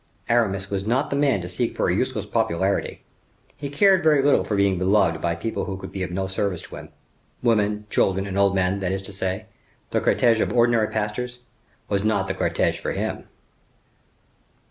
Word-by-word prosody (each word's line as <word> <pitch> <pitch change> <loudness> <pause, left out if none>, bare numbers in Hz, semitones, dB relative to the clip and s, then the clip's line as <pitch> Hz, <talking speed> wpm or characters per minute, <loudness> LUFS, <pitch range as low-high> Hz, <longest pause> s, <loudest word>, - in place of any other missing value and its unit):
Aramis 100 -5 +1
was 95 -1 -1
not 125 +7 0
the - - 0
man 140 -8 +2
to 85 - -6
seek 100 +7 -2
for - - 0
a 90 - +2
useless 110 0 -1
popularity. 100 -3 -1 0.5
He 145 -1 -6
cared 190 +5 +4
very 150 -3 +4
little 145 0 +4
for 105 - -2
being 100 -2 +2
beloved 95 -4 +2
by 85 -1 0
people 115 +4 -3
who 95 -2 -4
could - - -9
be 95 - -5
of 90 - -2
no 95 +2 -2
service 95 -1 -2
to - - -10
him. - - -10 0.5
Women, 105 -3 +1
children, 95 0 +1
and 95 -1 -5
old 100 -1 +3
men, 95 +1 +1
that 95 -2 -2
is 95 0 -3
to 100 - -8
say, 95 +2 -3 0.5
the - - +1
cortege 115 -2 +3
of 95 - 0
ordinary 120 -2 +3
pastors; 110 +4 -3 0.5
was 100 -1 0
not 105 -3 +1
the - - -2
cortege - - 0
for - - -3
him. - - -4
100 Hz, 195 wpm, -23 LUFS, 95-115 Hz, 0.5 s, cared